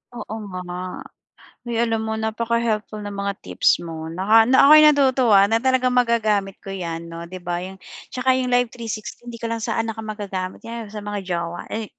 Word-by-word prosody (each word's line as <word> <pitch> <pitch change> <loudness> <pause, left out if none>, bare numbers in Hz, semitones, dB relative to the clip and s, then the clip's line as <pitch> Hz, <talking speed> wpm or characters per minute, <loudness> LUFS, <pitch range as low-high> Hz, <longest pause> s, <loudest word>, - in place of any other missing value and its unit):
Oo, 235 - -7 0.3
nga. 180 +1 -6 0.6
Uy, 235 - -3
alam 225 -1 0
mo 220 - -2
napaka-helpful 220 -1 -1
ng 205 - -5
mga 200 0 -1
tips 90 - +2
mo 160 -2 -6
naka 200 +7 +4
na 260 +1 +4
ako'y 305 +1 +9
natutuwa 260 -8 +5
na 225 - +3
talagang 255 0 +2
magagamit 220 -5 +2
ko 195 - -8
'yan, 170 -3 -5
'no, 170 0 -7
'di 185 +1 -9
ba, 175 0 -2
'yong 185 +2 -7 0.4
'tsaka 255 0 +2
'yong 255 - -1
live 245 -1 +2
360 230 0 -7
di 240 -1 -7
ka 230 - -2
lang 230 - -1
sa - - -2
anak 225 -1 -5
ko - - -4
magagamit 195 -3 -5
yew 230 -1 -6
sa 210 0 -7
mga 205 0 -3
jowa, 170 -1 -3
eh, 220 -1 -5
220 Hz, 195 wpm, -22 LUFS, 185-235 Hz, 0.6 s, ako'y